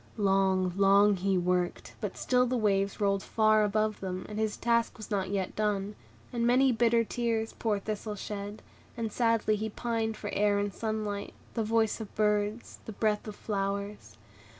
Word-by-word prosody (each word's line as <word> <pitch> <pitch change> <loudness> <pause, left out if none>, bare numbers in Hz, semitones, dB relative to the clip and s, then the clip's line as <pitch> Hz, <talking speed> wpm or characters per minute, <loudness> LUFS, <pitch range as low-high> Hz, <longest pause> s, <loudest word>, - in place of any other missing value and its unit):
Long, 190 -2 +2
long, 200 +1 +5
he 190 +1 +1
worked; 180 0 -1
but - - -4
still 250 0 +2
the 250 +1 0
waves 200 -3 +1
rolled 200 -1 +1
far 215 0 +3
above 215 +1 0
them, 185 -1 -4
and 210 0 -5
his 220 -1 -1
task 235 0 +1
was 215 0 -10
not 190 -2 0
yet 195 -2 -2
done; 210 -1 -1 0.4
and 235 -1 +1
many 260 +2 +5
bitter 235 0 +3
tears 230 -1 -1
poor 215 -3 0
Thistle 210 +1 -4
shed, 205 +1 -6 0.3
and 225 -2 -2
sadly 230 -2 +2
he 220 +1 -3
pined 225 0 -2
for - - -5
air 205 0 +2
and 200 -1 -1
sunlight, 215 -2 -3 0.2
the 225 - -1
voice 225 0 +1
of 215 - -9
birds, 210 +1 0
and 220 - -8
breath 215 -1 +1
of 210 - -6
flowers. 200 - -4
210 Hz, 175 wpm, -29 LUFS, 200-225 Hz, 0.4 s, long